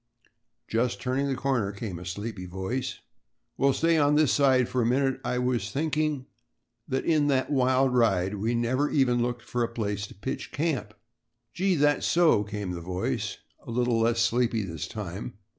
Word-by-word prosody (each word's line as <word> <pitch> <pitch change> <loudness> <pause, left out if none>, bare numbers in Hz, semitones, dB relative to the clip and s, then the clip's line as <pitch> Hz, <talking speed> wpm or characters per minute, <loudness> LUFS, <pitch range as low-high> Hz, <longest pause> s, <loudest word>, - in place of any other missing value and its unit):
"Just 120 +2 0
turning 135 +2 -1
the 135 - 0
corner," 130 -6 0
came 100 -4 -6
a 90 - -9
sleepy 95 +1 -5
voice. 95 +8 -4 0.5
"Well, 140 +2 +3
stay 165 +3 +2
on 145 0 +4
this 150 -2 +4
side 130 -3 +4
for 125 - 0
a - - +2
minute. 130 +3 +1
I 125 - -1
was 125 -1 +1
just 105 +3 -6
thinking 150 -2 0 0.6
that 130 -1 -1
in 155 -3 +3
that 130 -1 +1
wild 130 -1 +3
ride 95 -6 +2
we 115 +4 0
never 130 +5 +1
even 125 -4 +2
looked 120 0 -2
for 120 - -3
a - - +1
place 105 -3 -3
to - - -14
pitch 105 +7 -5
camp." 140 -9 -2 0.6
"Gee, 185 +1 +1
that's 145 -1 +2
so," 165 -11 +4
came 105 -2 -4
the 85 -1 -5
voice, 90 +2 -2 0.3
a - - -11
little 120 0 +1
less 115 +1 +2
sleepy 115 -1 +2
this 80 -5 -5
time. 105 +2 -6
125 Hz, 180 wpm, -27 LUFS, 105-135 Hz, 0.6 s, on